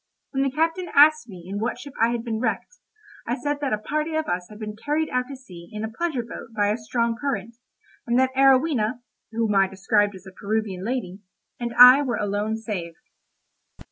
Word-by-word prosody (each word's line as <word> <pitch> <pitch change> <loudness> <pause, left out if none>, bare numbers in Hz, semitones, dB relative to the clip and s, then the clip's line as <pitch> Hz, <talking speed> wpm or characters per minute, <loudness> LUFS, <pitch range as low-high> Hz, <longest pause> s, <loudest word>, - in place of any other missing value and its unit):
When 270 - -1
the 275 - +2
captain 325 +6 -1
asked 305 -2 +6
me 180 -4 -10
in 200 +2 -4
what 225 +3 -2
ship 280 +2 -10
I 230 - +5
had 235 -1 -2
been 225 -2 -3
wrecked, 255 - -3 0.5
I 240 - 0
said 290 +3 -2
that 280 -3 -1
a 215 - +1
party 305 +8 -2
of 315 0 0
us 180 0 -2
had 210 - -12
been 210 -1 -6
carried 300 +7 -2
out 250 0 0
to 275 - -7
sea 180 -10 -13
in 215 0 -5
a 220 - -4
pleasure 295 -1 -2
boat 230 -1 -10
by 205 -1 +2
a 210 - 0
strong 235 0 -1
current, 230 -5 -3 0.5
and 235 +1 +2
that 260 0 +2
Arowhena 260 -4 +3 0.3
(whom 225 -2 0
I 195 -1 +4
described 200 +1 +1
as 185 0 -13
a 190 - -10
Peruvian 200 -1 -3
lady) 210 -5 -3 0.4
and 240 -1 -3
I 250 +3 +10
were 250 -6 -1
alone 205 +2 -1
saved. 190 -7 -5
230 Hz, 205 wpm, -24 LUFS, 210-270 Hz, 0.5 s, I